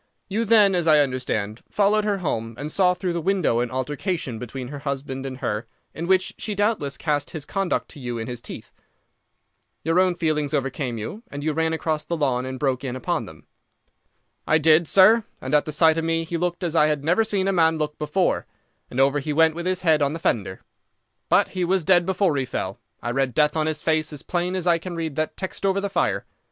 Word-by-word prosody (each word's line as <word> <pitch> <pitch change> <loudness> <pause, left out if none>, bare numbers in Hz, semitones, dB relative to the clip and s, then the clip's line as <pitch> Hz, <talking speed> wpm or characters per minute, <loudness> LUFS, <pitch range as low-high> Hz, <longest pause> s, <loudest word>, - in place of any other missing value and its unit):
You 220 +4 0
then, 210 -3 +5
as 175 -2 0
I 155 -1 +7
understand, 125 -6 -1
followed 210 +1 +2
her 205 -2 +1
home 115 - -3
and 145 +3 -5
saw 180 0 +3
through 180 0 -2
the 170 - -2
window 185 -9 +1
an 120 0 0
altercation 130 - -3
between 125 +1 -6
her 145 0 -7
husband 135 -1 -4
and 130 -1 -6
her, 110 -2 -3 0.3
in 170 +1 -5
which 190 0 +2
she 210 - -3
doubtless 205 -9 0
cast 145 -2 -1
his 155 -3 -7
conduct 195 +1 -1
to 150 - -11
you 120 -2 -4
in 115 - -4
his 120 0 -6
teeth. - - -9 1.1
Your 165 +3 +2
own 185 -1 +3
feelings 155 -3 0
overcame 135 -3 -2
you, 110 - -6
and 145 - -6
you 155 0 0
ran 160 +1 0
across 160 -1 -1
the 170 +2 -3
lawn 130 -4 0
and 130 0 -5
broke 130 -1 -1
in 130 -2 -3
upon 130 - -2
them." - - -14 1.0
"I 155 - +5
did, 160 +1 +4
sir, 215 +6 +6 0.2
and 130 +2 -5
at 150 - +4
the 155 - -4
sight 160 +1 +4
of - - -2
me 165 0 0
he 165 +1 -5
looked 175 +1 -2
as 170 -2 -2
I 150 -2 +5
have 150 -2 -1
never 175 +8 +3
seen 200 -3 0
a 195 - +2
man 160 -2 +3
look 150 -1 -3
before, 155 +5 0 0.4
and 125 - -4
over 135 +2 +4
he 150 +2 -3
went 160 +1 +4
with 170 +2 -4
his 185 0 0
head 160 -3 +4
on 140 +1 +1
the - - -3
fender. 100 - -1 0.7
But - - +4
he 185 -1 -2
was 185 0 +1
dead 175 +1 +4
before 190 -4 +1
he 135 - 0
fell. 95 -5 -4 0.2
I 120 - -1
read 130 -2 0
death 150 0 +3
on 155 -1 +1
his 155 -1 -2
face 155 -1 +1
as 145 -3 -8
plain 180 +1 -1
as 185 -2 -2
I 170 -1 +3
can 175 +1 -6
read 165 -3 -3
that 155 0 -2
text 190 +1 -6
over 195 0 +2
the 200 0 -2
fire. 195 - 0
155 Hz, 230 wpm, -23 LUFS, 135-180 Hz, 1.1 s, I